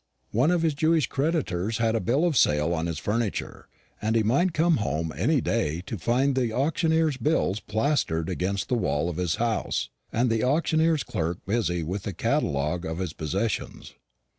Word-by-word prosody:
One 125 +8 +3
of 175 -2 +2
his 160 -2 +2
Jewish 155 0 +2
creditors 115 - -1
had 115 -1 +1
a - - +2
bill 125 - +1
of 170 -4 +1
sale 75 -4 +3
on 80 0 -1
his 85 -3 -3
furniture, 105 +6 -3 0.3
and 110 +1 0
he 110 - +3
might 140 - +2
come 165 +1 +2
home 80 -7 -2
any - - +2
day 80 +3 -1
to 110 - -4
find 125 +9 +1
the 125 -3 0
auctioneer's 160 +3 +1
bills 130 -7 +1
plastered 110 - 0
against 95 +2 -2
the - - 0
wall 85 -9 0
of 85 - -5
his 90 -2 0
house, 115 -2 -1 0.2
and 120 +1 +1
the 115 -1 +1
auctioneer's 160 +2 +2
clerk 85 +1 -2
busy 100 -5 0
with 95 +5 -3
the 100 - -5
catalogue 75 +2 0
of 80 -1 -4
his 90 -3 -3
possessions. 80 +8 -3
110 Hz, 180 wpm, -26 LUFS, 90-140 Hz, 0.3 s, One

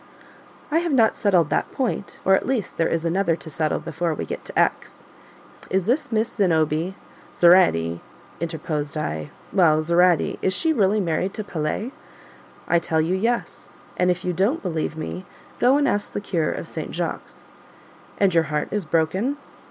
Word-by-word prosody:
"I 320 - +3
have 340 -3 -1
not 230 -4 +4
settled 180 -7 +2
that - - 0
point, 245 -6 -3
or 190 - +5
at 190 - +2
least 245 -7 -2
there 165 - +2
is 165 0 -1
another 170 0 +1
to 160 -1 -9
settle 155 +1 0
before 170 -2 -2
we - - -4
get - - -6
to - - -2
X. - - 0 0.7
Is 190 -1 +1
this 250 +5 0
Miss 220 +1 +1
Zenobie" 165 -1 +1 0.4
(Zoraide, 85 - +4 0.4
interposed 155 -2 -3
I) 80 - -3 0.2
"well, 165 -5 +4
Zoraide 170 +1 +3
is 190 - +1
she 320 +8 +1
really 210 -4 +2
married 185 +1 -1
to 215 - -4
Pelet?" 175 +7 -3 0.8
"I 170 - +3
tell 165 -1 0
you 160 +3 +1
yes 230 +5 -2 0.3
and 180 - +2
if 180 0 -1
you 180 - 0
don't 200 - 0
believe 160 -3 -2
me, 170 +3 -5 0.4
go 255 +3 +5
and 290 -1 +2
ask 205 0 -1
the - - -2
cure 175 -6 -1
of - - -5
St. - - -6
Jacques." - - -4 0.8
"And 195 -3 +3
your 165 -1 +3
heart 150 0 -2
is 210 -3 -2
broken?" 170 - 0
180 Hz, 175 wpm, -23 LUFS, 160-205 Hz, 0.8 s, or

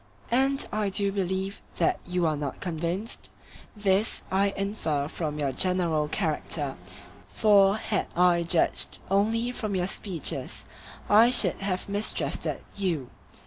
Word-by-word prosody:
And 270 +3 +2
I 210 -1 -1
do 200 0 +1
believe 190 0 -3 0.2
that - - +1
you 180 -1 0
are 155 -1 +1
not 145 -2 -5
convinced—this 190 +3 -3
I 195 +1 +2
infer 180 -8 -2
from 155 -1 -4
your 145 -2 -1
general 170 -2 +1
character, 150 -4 -2 0.5
for 200 - +4
had 215 -2 -2
I 175 0 +4
judged 170 0 +2
only 225 +5 +1
from 215 -5 -4
your 180 -1 0
speeches 185 -4 -3 0.4
I 220 +3 +6
should 250 - +7
have 190 -2 -3
mistrusted 205 +2 0
you. 170 -10 -2
190 Hz, 125 wpm, -26 LUFS, 165-205 Hz, 0.5 s, should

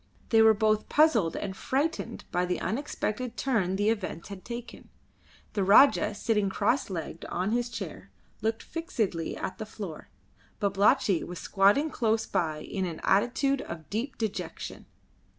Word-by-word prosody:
They 225 -2 +5
were 220 0 +7
both 215 0 +1
puzzled 240 - +4
and 190 -2 -4
frightened 290 +10 -2
by 180 0 +1
the 180 - -1
unexpected 245 0 -3
turn 210 -9 +1
the 205 +2 +2
events 190 -4 -4
had 195 -2 -8
taken. 240 0 -8 0.6
The 200 - +1
Rajah, 215 +5 +6
sitting 210 -2 +1
crosslegged 195 - -1
on 185 +4 -2
his 240 +1 0
chair, - - -7 0.3
looked 225 0 -1
fixedly 220 - -2
at 190 - -5
the 215 - -4
floor; 195 -7 -8 0.5
Babalatchi 200 -2 +3
was 180 +1 -7
squatting 205 - +3
close 225 -1 +1
by 155 -3 -1
in 190 -2 -3
an 165 -2 -6
attitude 255 +7 +2
of 165 -2 -8
deep 235 +6 -3
dejection. 220 -3 -5
215 Hz, 145 wpm, -28 LUFS, 190-240 Hz, 0.6 s, were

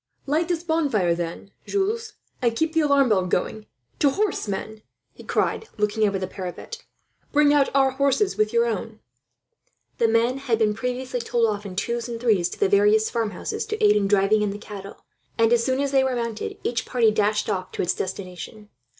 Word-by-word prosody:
"Light 310 +4 +1
this 345 -2 -1
bonfire 285 - +1
then, 170 +3 -5 0.2
Jules, 430 +3 -1 0.3
and 235 -2 +1
keep 320 +6 0
the 325 - +3
alarm 280 -4 +3
bell 190 -4 +2
going. 215 +4 -2 0.3
"To 285 - +4
horse, 400 - -1
men!" 215 +2 -5 0.3
he - - -13
cried, 445 - -1
looking 210 +1 +1
over 200 -1 -1
the 185 - -3
parapet. 185 - -7 0.5
"Bring 295 0 +4
out 285 -2 +3
our 270 -1 +4
horses 280 +10 +1
with 215 0 +1
your 235 0 +3
own." 220 -1 -4 1.0
The 230 - +4
men 230 +4 +2
had 250 -5 0
been 215 -2 +2
previously 250 +2 -3
told 235 0 +1
off 205 -2 -2
in 185 - -8
twos 235 +4 -2
and 230 -1 -5
threes 210 -7 +2
to - - -9
the 405 - +3
various 415 +2 +3
farmhouses, 220 -5 -2
to 430 0 -3
aid 210 0 +6
in 205 -1 +2
driving 205 +1 +3
in 210 - +1
the 200 - -5
cattle 200 -2 -10 0.3
and, 230 0 +4
as 235 -1 +3
soon 260 +2 0
as 280 -1 0
they 270 -1 +4
were 260 -1 0
mounted, 230 -2 -4
each 235 -1 -2
party 235 -4 +3
dashed 210 0 +1
off 185 -1 -2
to - - -1
its 175 - +1
destination. 190 +3 -6
230 Hz, 200 wpm, -24 LUFS, 210-275 Hz, 1.0 s, aid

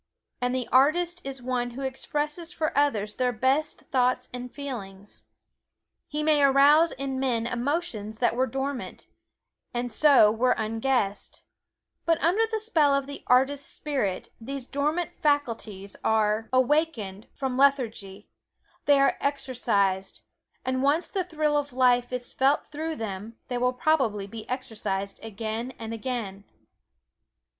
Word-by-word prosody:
And 250 +1 0
the 255 -2 -2
artist 345 +7 +3
is 270 -2 -6
one 245 -1 -1
who 275 - -4
expresses 295 +5 -3
for 320 -2 -2
others 220 -8 +1
their 250 +2 0
best 265 +6 0
thoughts 255 -1 +1
and 250 0 -6
feelings. 205 -8 -8 0.8
He 300 +1 -3
may 300 -1 +3
arouse 285 +4 +6
in 270 0 -3
men 240 -4 0
emotions 245 -4 -2
that 240 0 +1
were 260 +2 +2
dormant, 270 -1 -4 0.7
and 240 0 -2
so 260 -4 +6
were 250 +3 +2
unguessed; 225 -1 -1 0.6
but 330 -1 +2
under 400 +7 +2
the 445 -1 -1
spell 320 -11 +3
of 275 -1 0
the 280 0 -9
artist 270 +3 +2
spirit, 265 -11 -2
these 275 +2 -5
dormant 305 +6 -1
faculties 230 - -1
are 220 0 +1
awakened 255 -7 +1
from 265 -2 -2
lethargy 230 -8 +1 0.6
they 285 -1 +5
are 275 - +3
exercised, 205 -9 0 0.4
and 260 0 0
once 290 +5 +2
the 385 -2 0
thrill 310 -4 0
of 290 -2 -1
life 245 -1 +3
is 250 -1 -2
felt 275 +2 +2
through 315 +2 -3
them, 215 -1 -6
they 245 - -1
will 250 +1 +2
probably 250 -7 +1
be 220 +2 -9
exercised 210 -6 -4
again 225 +3 -4
and 225 0 -6
again. 225 -5 -4
255 Hz, 135 wpm, -26 LUFS, 225-290 Hz, 0.8 s, arouse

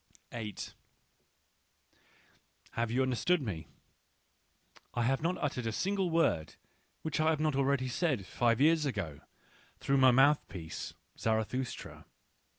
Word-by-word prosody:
8 110 -3 -6 2.0
Have 115 0 -1
you 125 +3 +2
understood 130 +8 +2
me? 95 - -5 1.3
I 120 - +1
have 135 +4 +1
not 175 +3 0
uttered 125 -5 -2
a - - 0
single 190 - 0
word 165 - +1 0.5
which 160 -2 -2
I 155 0 +4
had 160 -2 +1
not 155 -2 +1
already 135 -1 +2
said 130 - 0
five 115 +3 +1
years 155 +1 +4
ago 95 - -3 0.6
through 140 - +2
my 130 -1 +7
mouthpiece 125 - +1 0.2
Zarathustra. 115 +3 -2
130 Hz, 120 wpm, -32 LUFS, 115-155 Hz, 2.0 s, my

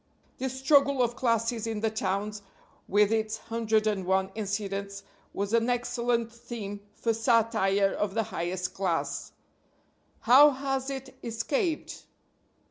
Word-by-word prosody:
This 260 0 -3
struggle 275 -1 +4
of 240 0 -1
classes 230 -1 0
in 220 -2 -3
the 220 -1 +1
towns, 210 0 -2 0.5
with 205 +1 +3
its 220 0 0
hundred 220 -1 0
and 205 -3 0
one 190 +1 +1
incidents, 200 -1 -4 0.3
was 200 +2 -3
an 230 +1 +3
excellent 240 -1 0
theme 235 -4 -7 0.2
for 230 - 0
satire 220 -4 +2
of 205 -1 -2
the 225 - +2
highest 180 -3 -3
class. 185 -4 -2 0.9
How 270 +5 +8
has 270 -1 -2
it 270 -1 -6
escaped? 275 - -2
225 Hz, 130 wpm, -28 LUFS, 200-245 Hz, 0.9 s, How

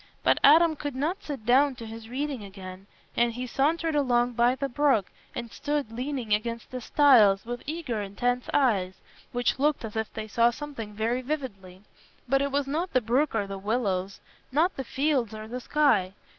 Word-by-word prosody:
But - - +3
Adam 320 +2 +6
could 290 -2 -5
not 310 +8 -2
sit 275 -8 -7
down 265 +3 +4
to 230 - -9
his 225 0 -9
reading 270 -2 -3
again, 190 -1 -10 0.3
and 235 -1 +2
he 250 +2 -4
sauntered 315 +6 0
along 245 -4 +2
by 240 +2 +3
the 275 +1 -2
brook 265 -6 +1 0.2
and 235 -1 -5
stood 290 -5 -2
leaning 250 -2 -2
against 230 +2 -2
the 255 -1 -5
stiles, 230 -8 +5
with 240 +1 -5
eager 295 -9 -3
intense 245 +5 -2
eyes, 200 -10 +2 0.4
which 245 +1 0
looked 295 -3 +1
as 215 - -8
if 220 0 -2
they 220 0 -6
saw 230 +2 +3
something 235 -5 -7
very 230 +4 0
vividly; 205 -10 -6 0.4
but 270 +2 +2
it 280 0 -1
was 285 0 0
not 320 +6 -2
the 255 - +5
brook 250 +5 +1
or 210 -2 +1
the 195 0 -6
willows, 200 -3 -2 0.3
not 320 +7 +2
the 270 - -4
fields 265 -4 0
or 215 0 -7
the 250 +3 -5
sky. 240 -11 +2
245 Hz, 185 wpm, -27 LUFS, 220-285 Hz, 0.4 s, Adam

